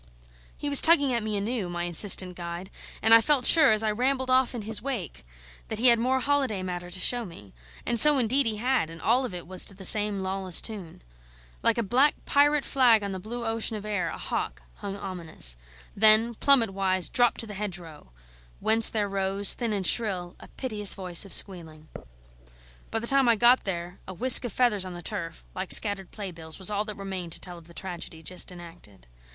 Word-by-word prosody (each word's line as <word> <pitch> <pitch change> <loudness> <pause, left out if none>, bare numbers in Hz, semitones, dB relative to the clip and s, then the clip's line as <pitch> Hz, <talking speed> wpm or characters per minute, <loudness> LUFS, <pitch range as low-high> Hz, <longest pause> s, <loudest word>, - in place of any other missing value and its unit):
He 290 - -6
was 285 -1 +6
tugging 285 -6 +4
at 235 - -1
me 215 -1 -4
anew, 205 -2 -4
my 175 0 -5
insistent 180 +1 +2
guide; 175 +2 -8 0.3
and 225 +1 +4
I 230 - +7
felt 260 +1 0
sure, 315 -6 +6
as 215 0 +1
I 215 - 0
rambled 260 +3 -2
off 255 -1 +1
in 230 - -6
his 215 -1 -3
wake, 210 - -6 0.4
that 220 - -6
he 245 +3 +4
had 235 -1 +3
more 260 +3 0
holiday 260 -8 -2
matter 175 -1 -6
to 180 +1 -6
show 245 +5 0
me. 165 - -14 0.3
And 235 - -1
so, 300 +2 +8
indeed, 255 +2 +1
he 215 -1 -3
had; 250 -6 -1
and 165 0 -12
all 250 +8 +1
of 240 - -8
it 175 - -8
was 185 +1 -2
to 195 - -5
the 190 0 -3
same 205 0 +4
lawless 190 -2 +1
tune. 195 - -5 0.6
Like - - +1
a 235 - -1
black 260 +8 +1
pirate 290 0 +1
flag 240 -6 +2
on 200 - -5
the 190 - -6
blue 235 +5 -8
ocean 225 0 -2
of 210 - -10
air, 195 -5 -3
a - - -8
hawk - - -5
hung 200 0 -7
ominous; 170 - 0 0.4
then, 220 +3 +4
plummet 235 -3 +2
wise, 190 -2 -1
dropped 245 -1 0
to - - -1
the 210 - -10
hedgerow, 175 - -8 0.5
whence 225 +1 +4
there 210 -2 -3
rose, 195 0 +2
thin 235 -3 -4
and 200 -3 -3
shrill, 185 -5 0
a - - -14
piteous 210 -6 -1
voice 180 -1 -1
of 195 - -14
squealing. 160 -5 -2 1.0
By - - -4
the 225 - -5
time 270 0 +2
I 230 - +4
got 240 +4 +3
there 175 -1 -6
a 190 - -9
whisk 250 +6 +6
of 240 - -5
feathers 225 -6 0
on 185 -1 -8
the 175 - -11
turf 165 -5 -6
like 185 0 -6
scattered 200 -3 +3
playbills 170 -6 -9
was 190 +1 +1
all 205 +1 -2
that 210 -2 -8
remained 190 -4 -6
to - - -3
tell 175 -2 -7
of 165 - -20
the 170 - -17
tragedy 170 -3 -8
just 180 +3 -5
enacted. 170 - -14
205 Hz, 215 wpm, -25 LUFS, 180-235 Hz, 1.0 s, so